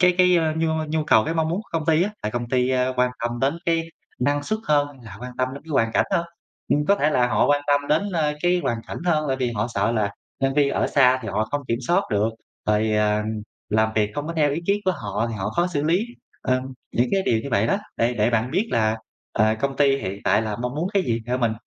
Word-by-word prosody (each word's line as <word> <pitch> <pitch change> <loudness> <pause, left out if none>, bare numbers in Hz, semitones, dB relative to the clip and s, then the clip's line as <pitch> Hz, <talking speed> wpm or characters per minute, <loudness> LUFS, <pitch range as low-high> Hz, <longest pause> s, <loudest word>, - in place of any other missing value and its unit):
cái 180 -1 +5
cái, 180 -1 +5
a, 160 -1 0
nhu 165 0 +1 0.2
nhu 155 0 0
cầu, 110 -6 +4
cái 165 - -2
mong 160 -1 +1
muốn 175 +5 -1
của - - -25
công 155 - -6
ty 160 0 +4
á, 200 - 0
là 105 - -1
công 120 +1 -3
ty, 125 0 +1
a, 130 0 +2
quan 125 0 +3
tâm 120 0 -1
đến 140 +5 +1
cái 165 -1 +2 0.4
năng 145 +3 +1
suất 215 +9 -2
hơn 145 -1 +3
là 105 -4 -10
quan 125 0 -7
tâm 130 0 +1
đến 140 - -9
cái 160 - -12
hoàn 115 -4 +2
cảnh - - +2
hơn. 170 - +1 0.4
Ừm, 150 0 +1
có 200 - +6
thể 150 -6 +2
là 125 -4 +3
họ - - +2
quan 145 0 +2
tâm 145 0 +3
đến, 195 +7 +1
ơ, 150 -3 +1
cái 180 0 +3
hoàn 120 - -1
cảnh - - -5
hơn, 155 -3 +2
tại 135 - +1
vì 125 -2 -1
họ 105 -1 -1
sợ 100 +3 +1
là 105 -3 0 0.3
nhân 135 0 +1
viên 140 -1 +3
ở - - +1
xa 130 -2 +4
thì 115 - -5
họ 110 +3 -1
không 145 - -1
kiểm 115 - 0
soát 180 +3 +4
được, 105 +1 +2 0.4
rồi, 105 +1 +2
à, 105 0 +2 0.5
làm 110 +1 +2
việc 105 -1 +1
không 145 +1 -3
có 165 - -3
theo 150 -2 +3
ý 155 - -2
kiến 200 +1 +2
của 185 - +3
họ 105 - -3
thì - - -4
họ 100 +1 -2
khó 170 +8 +1
xử 150 -6 -2
lý, 165 +5 +2 0.4
ờ, 130 0 +1 0.3
những 120 +1 +2
cái 195 - +3
điều 110 - +2
như 140 - -6
vậy 110 -2 +2
đó, 195 - +1 0.2
để 120 +2 +2
để 110 0 +2
bạn 115 +1 0
biết 195 - 0
là, 110 -1 +2 0.4
ờ, 110 0 +3
công 140 -1 -1
ty 140 -1 +4
hiện 100 -5 -5
tại - - +3
là 105 -2 -3
mong 125 +2 -2
muốn 165 +5 -1
cái 195 - +3
gì 115 -7 -1
ở 125 +1 0
mình. 115 -3 +1
130 Hz, 275 wpm, -23 LUFS, 115-160 Hz, 0.5 s, có